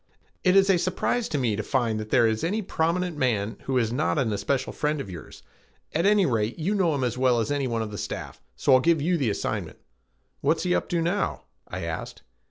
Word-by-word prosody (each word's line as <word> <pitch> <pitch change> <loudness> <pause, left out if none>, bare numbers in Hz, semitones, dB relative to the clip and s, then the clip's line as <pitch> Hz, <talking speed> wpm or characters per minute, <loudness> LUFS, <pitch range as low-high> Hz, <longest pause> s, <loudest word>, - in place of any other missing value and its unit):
It 185 0 +4
is 195 0 +6
a 180 - +3
surprise 185 +6 -1
to 150 - -1
me 120 -6 +1
to 110 - -2
find 115 -1 0
that 110 0 -6
there 115 - +4
is 110 -1 0
any 210 +6 0
prominent 170 -1 -1
man 110 -5 0
who 135 -1 0
is 115 -2 +1
not 155 +4 0
an 120 -7 +1
especial 100 +7 -1
friend 150 0 -1
of 100 -8 -6
yours. 85 -4 -10 0.5
At 170 +5 +2
any 205 -2 +4
rate 115 -4 0
you 175 +6 -1
know 180 -7 +2
him 135 - -1
as 125 0 -1
well 125 -2 +3
as 115 - -1
anyone 130 -6 0
of 105 - -6
the 105 - -6
staff, - - -6
so 135 - +3
I'll 130 - +7
give 165 +4 +3
you 170 +5 +1
the 135 -8 +1
assignment." 100 - -3 0.6
"What's 160 - +1
he 180 -1 +1
up - - -1
to 170 -1 0
now?" 185 +5 -1 0.2
I - - -5
asked. - - -5
140 Hz, 230 wpm, -26 LUFS, 115-170 Hz, 0.6 s, I'll